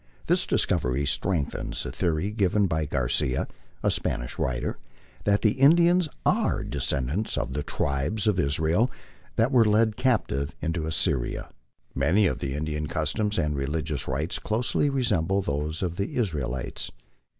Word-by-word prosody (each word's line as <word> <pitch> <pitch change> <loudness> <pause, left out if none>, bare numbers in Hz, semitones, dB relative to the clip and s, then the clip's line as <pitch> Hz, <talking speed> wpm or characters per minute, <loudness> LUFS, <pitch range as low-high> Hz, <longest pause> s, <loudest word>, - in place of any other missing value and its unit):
This - - +2
discovery 65 +3 +1
strengthens 70 +4 -1
the - - -4
theory 85 +4 0
given 105 -1 +2
by 80 -4 -1
Garcia, 65 0 +1 0.4
a - - +3
Spanish - - -2
writer, 65 -2 -2 0.5
that 100 0 +2
the 110 - +5
Indians 170 - +5 0.2
are - - +2
the - - -7
descendants 70 - -1
of 65 - -2
the 75 - -2
tribes 70 +9 -1
of 105 -4 +2
Israel 80 - +2 0.5
that 115 +3 +2
were 125 -4 +6
led 110 0 +3
captive 70 - 0
into 80 -1 -2
Assyria. 70 -5 0 0.4
Many 80 +10 +3
of 90 - 0
the 70 0 -3
Indian 75 0 -2
customs 100 +9 -1
and 75 -4 0
religious 75 +2 -2
rites 75 +6 -2
closely 120 +6 0
resemble 100 - +1
those 75 +3 -2
of 85 -1 -2
the 100 - -3
Israelites. 70 - -2
80 Hz, 145 wpm, -26 LUFS, 70-105 Hz, 0.5 s, were